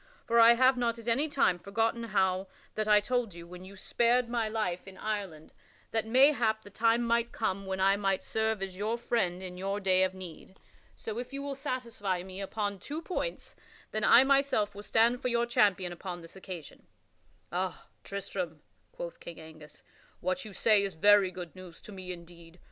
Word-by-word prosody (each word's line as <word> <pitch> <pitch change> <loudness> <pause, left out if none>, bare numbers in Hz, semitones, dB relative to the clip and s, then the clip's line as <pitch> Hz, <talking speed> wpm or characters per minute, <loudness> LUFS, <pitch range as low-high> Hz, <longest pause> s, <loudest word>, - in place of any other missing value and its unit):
For 235 0 +3
I 230 +1 +9
have 255 +1 +4
not 235 -1 0
at 230 0 -11
any 275 +7 +2
time 185 -11 +2
forgotten 225 +4 -1
how 190 -3 +1 0.3
that 215 0 -2
I 210 -1 +6
told 235 -3 -1
you 170 0 -9
when 180 +1 -11
you 195 +1 -12
spared 240 +4 +2
my 230 -2 0
life 195 -5 -2
in 190 -1 -11
Ireland 195 -8 -4 0.4
that 225 -1 -1
mayhap 240 -3 +4
the 205 - -13
time 230 +3 +2
might 235 0 +1
come 195 -3 -2
when 190 0 -2
I 195 +1 +4
might 195 -2 0
serve 220 -2 -1
as 190 -1 -5
your 215 +4 -1
friend 190 -7 -1
in 180 -1 -7
your 195 +2 -2
day 190 -2 +3
of 190 0 +1
need. 185 0 -10 0.4
So 220 +1 -5
if 250 +1 -6
you 275 0 -4
will 280 0 -3
satisfy 235 -9 -3
me 190 +1 -8
upon 200 0 -3
two 300 - -6
points, - - -4 0.4
then 215 0 -2
I 245 - +8
myself 275 -7 +2
will 200 - -8
stand 230 +4 +3
for - - -1
your 235 -1 +1
champion 195 -6 +2
upon 175 0 -7
this 165 - -14
occasion." 185 -4 -9 0.6
"Ah, 180 +2 -3 0.2
Tristram," 185 -5 -5 0.3
quoth - - -7
King 170 -1 -9
Angus, 155 -2 -13 0.4
"what 185 0 -2
you 215 - -8
say 210 +2 +4
is 195 -3 -3
very 205 +2 +5
good 180 -2 -8
news 185 -2 -12
to - - -12
me 185 -2 -7
indeed. 170 -1 -12
205 Hz, 195 wpm, -30 LUFS, 185-235 Hz, 0.6 s, I